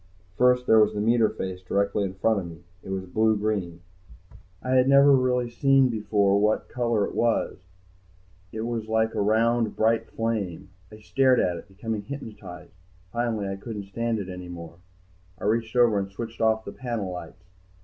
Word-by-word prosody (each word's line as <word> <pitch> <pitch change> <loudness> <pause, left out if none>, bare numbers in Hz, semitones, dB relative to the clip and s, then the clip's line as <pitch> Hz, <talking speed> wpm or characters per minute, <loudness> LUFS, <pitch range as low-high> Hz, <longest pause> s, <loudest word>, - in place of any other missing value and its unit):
First 125 +2 +3
there 110 -2 +6
was 105 0 +3
the - - -2
meter 115 +1 +3
face 95 -3 -5
directly 100 +2 0
in 95 -1 -4
front 110 +2 +1
of 90 - -6
me. 85 0 -12 0.2
It - - -11
was 95 -1 -3
blue 110 +3 +2
green. 100 -5 -2 0.8
I 130 - -3
had 130 0 +4
never 140 0 +7
really 125 -1 +1
seen 135 +1 +4
before 105 -3 +1
what 105 +1 +1
color 115 -4 0
it - - -7
was. 115 -4 0 0.9
It 110 - -5
was 115 -1 -3
like 110 0 +1
a - - -1
round, 115 +2 +2
bright 115 +1 +1
flame. 110 -6 -3 0.2
I 110 0 -13
stared 130 +3 +3
at 90 -1 +1
it, - - -11
becoming 105 +2 -4
hypnotized. 105 -7 -9 0.4
Finally 115 -3 -1
I 95 - -4
couldn't 105 -1 -7
stand 115 +2 -1
it 100 -3 -5
any 90 -1 -8
more, 85 -2 -9 0.6
I - - -10
reached 110 +2 0
over 120 -4 +4
and 95 0 -4
switched 115 +4 -7
off 110 0 +2
the - - -6
panel 115 -7 -4
lights. 90 0 -9
110 Hz, 180 wpm, -25 LUFS, 100-115 Hz, 0.9 s, never